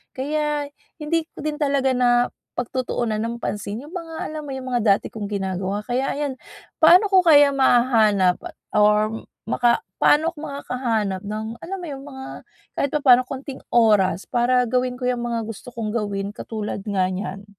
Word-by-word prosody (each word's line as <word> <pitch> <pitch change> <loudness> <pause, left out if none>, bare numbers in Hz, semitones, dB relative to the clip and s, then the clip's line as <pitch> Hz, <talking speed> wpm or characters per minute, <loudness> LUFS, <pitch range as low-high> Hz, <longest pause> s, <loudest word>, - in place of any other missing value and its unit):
Kaya, 295 +1 -1 0.3
hindi 320 +1 0
ko - - -13
din 300 -1 -2
talaga 275 -2 +1
napagtutuunan 245 -1 -1
ng 230 +1 -3
pansin 205 +3 -4
yung 325 - -13
mga 325 -2 -8 0.2
alam 310 -1 -6
mo, 275 - -6
yung 260 -1 -7
mga 240 -2 +1 0.2
dati - - -9
kong 210 -2 -5
ginagawa. 190 +2 -2
Kaya 255 +2 -1
ayan, 285 -2 -2 0.5
paano 355 +6 +7
ko 370 -1 +6
kaya 290 -3 +7
mahahanap 225 -8 +4
at - - -7 0.2
or 210 +1 +3 0.2
maka 240 - +2 0.2
paano 315 +3 +4
ako - - -42
makakahanap 235 -9 -2
ng 215 +2 -4 0.2
alam 385 +3 -5
mo 345 - -6
yung 275 -2 -7
mga 265 -1 -8 0.5
kahit 280 - +1
papaano 255 -4 +5
konting 270 0 -7
oras 205 -6 +3
para 250 0 +2
gawin 250 0 0
ko 250 - -3
yung 240 -1 -1
mga 230 -1 -1
gusto 225 +2 -8
kong 225 -2 -3
gawin 200 -3 -2
katulad 215 -2 -5
nga 190 -3 +1
nyan? 195 +1 -5
245 Hz, 165 wpm, -22 LUFS, 215-280 Hz, 0.5 s, paano